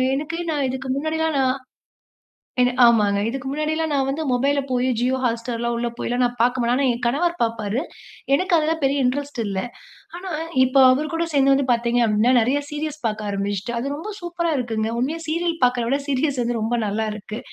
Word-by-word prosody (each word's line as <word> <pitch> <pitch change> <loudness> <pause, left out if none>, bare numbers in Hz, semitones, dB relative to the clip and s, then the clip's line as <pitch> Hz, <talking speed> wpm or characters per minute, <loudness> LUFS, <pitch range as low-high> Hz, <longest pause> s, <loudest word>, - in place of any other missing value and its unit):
எனக்கு 310 +4 -3
நான் 285 -3 0
இதுக்கு 265 0 -5
முன்னாடிலாம் 320 +1 -1
நான் 260 +1 +1 1.0
என்ன 250 0 +4
ஆமாங்க. 210 -4 +4
இதுக்கு 270 +2 -5
முன்னாடிலாம் 310 +2 -1
நான் 270 -1 +1
வந்து 285 +4 -2
மொபைல்ல 280 +3 +2
போய் 250 0 +1
Jio 255 +2 +1
Hotstar 235 0 -1
எல்லாம் 235 0 -1
உள்ள 240 0 -1
போய்லாம் 245 +1 -1
நான் 245 - 0
பார்க்க 245 +2 +2
மாட்டேன். 240 +1 +2
ஆனா 275 0 +2
என் 235 - -8
கணவர் 340 +7 0
பாப்பாரு. 225 +1 -1 0.5
எனக்கு 370 +6 0
அதெல்லாம் 320 +1 +1
பெரிய 275 +1 +2
இன்ட்ரெஸ்ட் 280 0 -1
இல்ல. 195 -2 -2 0.6
ஆனா 370 +1 -7 0.3
இப்ப 260 +1 -3 0.2
அவரு 300 +4 0
கூட 335 +1 0
சேர்ந்து 275 -1 +4
வந்து 275 -1 +1
பார்த்தீங்க 235 +1 +1
அப்டின்னா 215 +4 +3
நெறைய 260 +6 +1
சீரிஸ் 300 0 -4
பார்க்க 215 -1 -2
ஆரம்பிச்சுட்டேன். 200 +3 -2
அது 275 +3 -3
ரொம்ப 415 +8 -6
சூப்பரா 345 -1 -2
இருக்குங்க. 225 -3 -1
உண்மையா 305 +6 -1
சீரியல் 335 +1 0
பார்க்குறத 245 -2 +1
விட 275 +1 +1
சீரிஸ் 275 -1 0
வந்து 235 0 -1
ரொம்ப 225 +2 -1
நல்லா 215 +2 -1
இருக்கு. 215 +1 -7
260 Hz, 190 wpm, -22 LUFS, 235-300 Hz, 1.0 s, என்ன